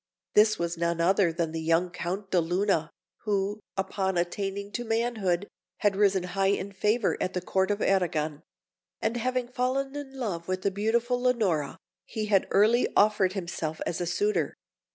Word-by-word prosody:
This 215 0 +5
was 170 0 -2
none 170 0 0
other 180 +1 +3
than 165 -1 -2
the 160 0 -3
young 165 +2 +2
Count 190 +3 -4
de 180 - +4
Luna, 175 -1 +1 0.3
who, 205 0 -1 0.2
upon 190 -1 -1
attaining 195 +3 -2
to 240 - -3
manhood, 220 -5 0 0.3
had 205 -2 +2
risen 195 -2 +3
high 195 +2 0
in 200 0 0
favour 210 +3 +1
at 185 - -1
the 180 - 0
Court 190 +2 0
of 205 0 0
Arragon; 160 -6 +1 0.6
and 225 +2 -1
having 250 +1 -1
fallen 265 +2 -1
in 275 -2 -7
love 185 -10 -3
with 185 0 -2
the 200 - +2
beautiful 235 +5 0
Leonora, 210 - +1 0.3
he 215 -1 -4
had 200 -3 +2
early 220 +5 +4
offered 205 -3 +4
himself 170 -4 -4
as 175 - -2
a 175 - -1
suitor. 415 - 0
195 Hz, 170 wpm, -28 LUFS, 175-220 Hz, 0.6 s, This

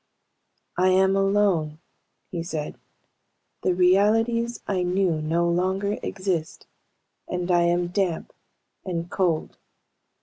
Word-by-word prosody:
"I 185 - +4
am 190 +1 +4
alone," 195 -6 +1 0.5
he 170 - -3
said. 160 -3 -5 0.8
"The 180 - +1
realities 225 +6 +2
I 190 -2 -1
knew 180 -3 +1
no 165 +3 +1
longer 190 +4 0
exist, 185 -5 -3 0.6
and 180 0 -2
I 175 -1 +4
am 175 0 +1
damp 180 -3 -2 0.5
and 175 -2 -4
cold. 175 -5 -1
180 Hz, 105 wpm, -24 LUFS, 170-195 Hz, 0.8 s, I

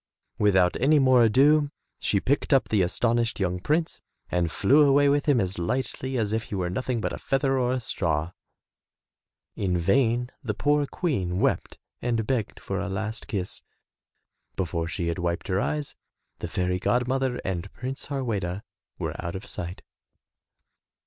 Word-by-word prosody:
Without 95 -4 +4
any 150 +4 +4
more 130 -3 +5
ado 145 +6 +4 0.3
she 100 - +1
picked 140 +9 0
up 135 -2 +4
the 105 -4 +3
aston 115 +6 +1
ished 115 -1 0
young 90 -2 0
prince 155 - 0 0.3
and 85 -2 +1
flew 140 - +4
away 145 0 +5
with 145 +1 +1
him 140 -5 +4
as 95 -3 -1
lightly 130 +6 -2
as 110 -2 0
if 110 0 -1
he - - -5
were 90 -2 -1
nothing 125 +3 -1
but - - -2
a - - -5
feather 135 -1 +1
or 125 -1 +1
a 130 - 0
straw. 85 -8 -1 1.2
In 90 -3 0
vain 120 +6 +2
the 105 -4 -2
poor 145 +2 +2
Queen 95 - -1
wept - - 0 0.2
and 115 -2 0
begged 115 -3 -2
for 100 - -3
a 100 - -3
last 110 +4 -4
kiss. 95 -3 -3 0.9
Before 85 -3 -2
she 85 0 -3
had 85 +2 -2
wiped 85 +2 -2
her 95 +1 +1
eyes, 150 -2 -2 0.4
the - - -4
fairy 90 0 -1
god 125 +4 +1
mother 130 -1 0
and 95 0 -3
Prince 130 +2 -5
Harweda 105 -9 -2 0.3
were - - -3
out 85 +1 -4
of 95 - -6
sight. 90 +1 -6
115 Hz, 170 wpm, -26 LUFS, 90-135 Hz, 1.2 s, more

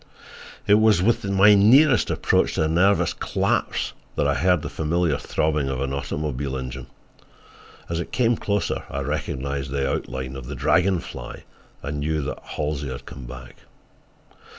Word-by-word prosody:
It 105 +1 +5
was 110 -3 +4
with 115 +3 +2
my 100 +1 +6
nearest 120 +6 +5
approach - - +1
to - - +1
a - - +1
nervous 95 +5 +3
collapse - - -1 0.2
that 70 - +1
I 70 - +2
heard 90 +3 +2
the - - -3
familiar 80 0 0
throbbing 75 -3 0
of 65 -1 -2
an 70 0 -2
automobile 70 -1 -3
engine. 65 -1 -6 1.0
As 85 0 -2
it 85 - -5
came 120 -1 +2
closer 100 -1 -2
I 70 - -3
recognized 70 -1 -3
the 70 0 -1
outline 65 0 -4
of 65 -3 -8
the - - -5
Dragon 85 +3 +2
Fly, - - -9 0.4
and 75 0 -4
knew 75 +1 -1
that - - -4
Halsey 75 -2 -4
had 65 - -7
come 65 -2 -10
back. 65 0 -10
75 Hz, 160 wpm, -23 LUFS, 70-95 Hz, 1.0 s, my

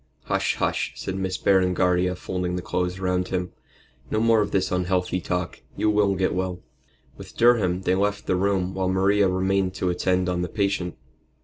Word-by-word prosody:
"Hush! - - 0
hush!" - - -1
said 95 - -5
Miss 95 -1 -2
Berengaria, 90 -1 +2
folding 90 -1 -3
the 90 - -4
clothes 90 +1 -2
round 90 -1 0
him, 90 -1 -3 0.6
"no 110 - 0
more 115 -1 +4
of 105 - -1
this 95 -1 0
unhealthy 90 0 0
talk. 90 +1 -3 0.2
You 105 - +2
will 105 -2 +2
get 95 0 0
well." 90 0 -3 0.5
With - - -12
Durham 100 -7 +3
they 90 - +2
left 100 +2 0
the 95 - +1
room 95 -1 0
while 95 -1 -1
Maria 95 +2 +3
remained 95 0 0
to 90 -2 0
attend 90 +1 0
on 90 -1 -1
the 90 - -3
patient. 100 -6 -1
95 Hz, 180 wpm, -24 LUFS, 90-95 Hz, 0.6 s, more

